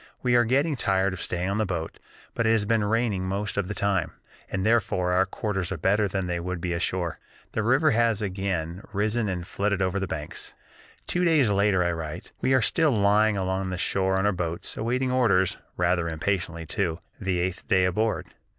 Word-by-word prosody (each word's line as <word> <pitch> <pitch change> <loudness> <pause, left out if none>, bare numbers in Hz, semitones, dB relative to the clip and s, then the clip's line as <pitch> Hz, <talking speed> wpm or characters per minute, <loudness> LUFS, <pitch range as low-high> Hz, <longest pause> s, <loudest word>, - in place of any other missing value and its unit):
We 125 -1 +2
are 120 0 +5
getting 140 +6 +2
tired 95 -5 +1
of 95 - -6
staying 90 +1 -2
on 100 +2 -1
the 110 - +2
boat, 85 -3 -4 0.3
but 115 - 0
it - - +4
has 110 -2 +2
been 110 0 +2
raining 105 -3 0
most 100 +2 -2
of 100 -3 -1
the 105 - -4
time, 95 -4 0 0.4
and 95 0 -1
therefore 100 -5 +2
our 90 +1 +3
quarters 95 -3 -3
are 95 - -2
better 100 +6 +2
than 95 0 -2
they 85 -1 -2
would 90 +1 -4
be 90 +1 -2
ashore. 85 -1 -2 0.3
The 110 - -1
river 135 +7 +3
has 115 -2 +2
again 95 -4 -3
risen 105 +2 0
and 90 -2 -3
flooded 100 +1 -1
over 95 0 0
the 95 - -2
banks." 75 -3 -6 0.5
Two 180 - 0
days 155 -10 +4
later 100 -2 +3
I 85 - +1
write: 80 -2 -6
"We 130 - +3
are 130 - +3
still 160 +5 +3
lying 105 -1 +3
along 95 0 -1
the 90 - -3
shore 95 +1 +1
on 95 - +1
the 105 0 +2
boats 85 -2 -4
'awaiting 125 +3 0
orders' 100 -8 +2 0.2
rather 85 -1 +1
impatiently 85 0 -2
too, 85 -1 -1 0.2
the 95 -3 -1
eighth 90 +1 -2
day 95 -1 +4
aboard. 110 +5 0
95 Hz, 205 wpm, -26 LUFS, 90-110 Hz, 0.5 s, are